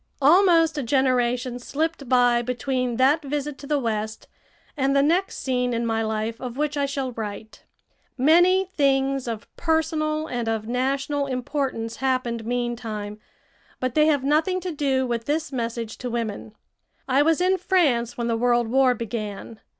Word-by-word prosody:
Almost 330 0 +5
a - - 0
generation 250 -1 +1
slipped 295 +1 -3
by 245 -2 +4
between 250 0 -2
that 275 +5 +4
visit 290 0 -4
to 280 - -9
the 295 0 +1
West 220 -4 -3 0.5
and 275 -2 +1
the 275 - +4
next 350 +6 +1
scene 250 -2 -1
in 235 0 -1
my 225 -1 0
life 220 +1 -3
of 250 -1 -6
which 300 0 -1
I 285 -1 0
shall 275 -2 -3
write. 220 -1 -7 0.5
Many 350 +7 +5
things 275 -6 +1
of 225 -2 -5
personal 315 -1 0
and 245 -6 -3
of 220 -1 -2
national 275 +3 -1
importance 255 -3 -3
happened 255 -4 -1
meantime, 230 -4 -3 0.6
but 255 -1 -2
they 305 +1 +4
have 290 -4 +2
nothing 315 +6 +2
to 360 0 -4
do 275 -4 0
with 235 -2 -3
this 305 +3 -1
message 235 -3 -4
to 250 - -4
women. 225 -2 -4 0.5
I 270 +1 +3
was 320 +2 +3
in 370 +1 +2
France 290 - +1
when 235 - -2
the 230 -1 0
World 240 0 +2
War 260 0 +4
began. 215 -1 -6
260 Hz, 160 wpm, -24 LUFS, 235-295 Hz, 0.6 s, Almost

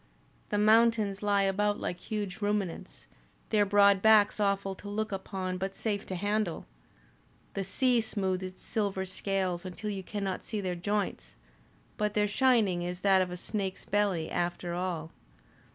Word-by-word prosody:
The 205 - 0
mountains 215 -1 +4
lie 205 -1 +2
about 205 +2 +1
like 180 - -3
huge 205 -2 -4
ruminants, 205 -4 -2 0.5
their 210 -2 +3
broad 200 -1 +5
backs 215 -1 +5
awful 200 -1 +1
to 205 +2 -9
look 215 +1 -2
upon 190 -1 -4
but 195 +1 -3
safe 205 -1 -2
to 185 - -3
handle. 205 -1 -1 0.9
The 195 - -2
sea 240 +5 +2
smoothes 190 -4 -1
its 185 0 -8
silver 200 -3 -1
scales 185 -2 -2
until 190 +3 -5
you 195 -1 -4
cannot 195 -1 -4
see 215 - -3
their 185 -2 -2
joints, 200 +3 -2 0.6
but 210 0 -1
their 210 0 +3
shining 210 -5 +3
is 180 +1 -4
that 195 -2 +5
of 185 - 0
a 180 - -5
snake's 195 0 -3
belly, 195 -6 +1
after 175 0 -2
all. 170 -3 -3
200 Hz, 155 wpm, -30 LUFS, 185-210 Hz, 0.9 s, broad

